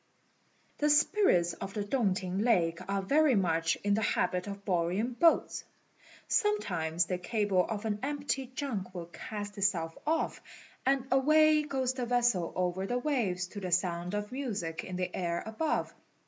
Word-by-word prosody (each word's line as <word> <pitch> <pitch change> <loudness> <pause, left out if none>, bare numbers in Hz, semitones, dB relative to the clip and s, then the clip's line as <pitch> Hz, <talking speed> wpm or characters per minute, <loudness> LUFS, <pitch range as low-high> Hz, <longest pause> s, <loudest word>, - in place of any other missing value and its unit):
The 295 - +2
spirits 295 - +3
of 195 - -7
the 210 - -1
Tung 205 -3 +1
t'ing 185 0 -3
lake 175 -7 +2
are 195 0 0
very 290 +5 +4
much 165 -4 +1
in 205 0 +2
the 215 - +1
habit 180 -3 0
of 200 0 -7
borrowing 185 +6 0
boats. 330 +6 +3 0.6
Sometimes 175 - +1
the 180 +1 -3
cable 205 -2 +1
of 220 -1 -4
an 210 -1 -1
empty 280 -1 -2
junk 245 -8 -4
will 175 -1 -5
cast 205 +3 -7
itself 170 -5 0
off, 325 +1 0 0.5
and 270 -1 +2
away 305 +3 +5
goes 265 -4 -1
the 250 -2 -3
vessel 240 -8 +2
over 185 +1 -1
the 245 - 0
waves 235 -10 0
to 205 - -7
the 185 -2 -4
sound 175 +1 0
of 210 +1 -3
music 210 -12 -3
in 185 - -6
the 180 0 -3
air 170 -2 -2
above. 220 +9 -1
205 Hz, 160 wpm, -31 LUFS, 180-260 Hz, 0.6 s, away